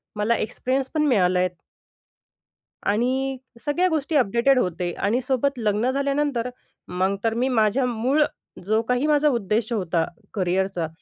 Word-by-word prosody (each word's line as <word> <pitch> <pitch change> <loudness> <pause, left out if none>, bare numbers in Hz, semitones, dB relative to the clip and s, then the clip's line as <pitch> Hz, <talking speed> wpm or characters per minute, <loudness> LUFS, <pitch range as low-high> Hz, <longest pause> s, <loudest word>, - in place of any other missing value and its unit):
मला 210 +3 +1
एक्सपिरियन्स 260 +4 -2
पण 305 -1 +2
मिळाला 185 -8 +3
आहे. 180 0 +2 1.4
आणि 260 +5 0 0.3
सगळ्या 345 +5 +2
गोष्टी 310 -1 -1
अपडेटेड 250 +1 +3
होते. 175 -3 -1
आणि 225 +9 0
सोबत 265 +2 0
लग्न 215 +3 +1
झाल्यानंतर 275 -3 0 0.4
मग 185 +2 0
तर 225 - +1
मी 260 - +2
माझ्या 230 +2 +2
मूळ 250 +6 +2 0.4
जो 215 +3 +2
काही 250 +4 +2
माझा 300 0 +3
उद्देश 225 -3 0
होता 170 -5 0 0.3
करिअरचा, 185 -3 0
235 Hz, 135 wpm, -23 LUFS, 200-270 Hz, 1.4 s, मिळाला